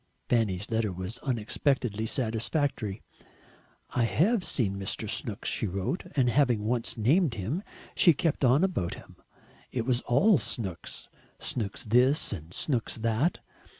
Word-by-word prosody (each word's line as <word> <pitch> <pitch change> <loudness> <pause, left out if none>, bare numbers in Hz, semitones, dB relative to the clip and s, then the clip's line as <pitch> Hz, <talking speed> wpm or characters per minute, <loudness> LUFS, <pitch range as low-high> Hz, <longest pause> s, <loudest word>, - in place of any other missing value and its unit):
Fanny's 105 -4 +1
letter 110 -2 +1
was 95 +6 -5
unexpectedly 120 -2 0
satisfactory. 115 -2 -1 0.9
"I 120 - +2
HAVE 195 - +2
seen 100 - +1
Mr. 95 - -2
Snooks," - - -2
she - - 0
wrote, 100 - -3
and 130 -4 +3
having 120 -4 +2
once 120 +1 -1
named 135 - +3
him 115 - -2 0.3
she 170 - +6
kept 150 0 -1
on 130 +6 +5
about 175 - -1
him; - - -14 0.5
it 120 -3 -2
was 125 -1 +1
all 165 - +5
Snooks 95 -9 -3 0.3
Snooks 105 -2 -3
this 125 +5 +3
and 80 -3 -8
Snooks 120 - -1
that. 115 +8 0
120 Hz, 135 wpm, -28 LUFS, 105-140 Hz, 0.9 s, she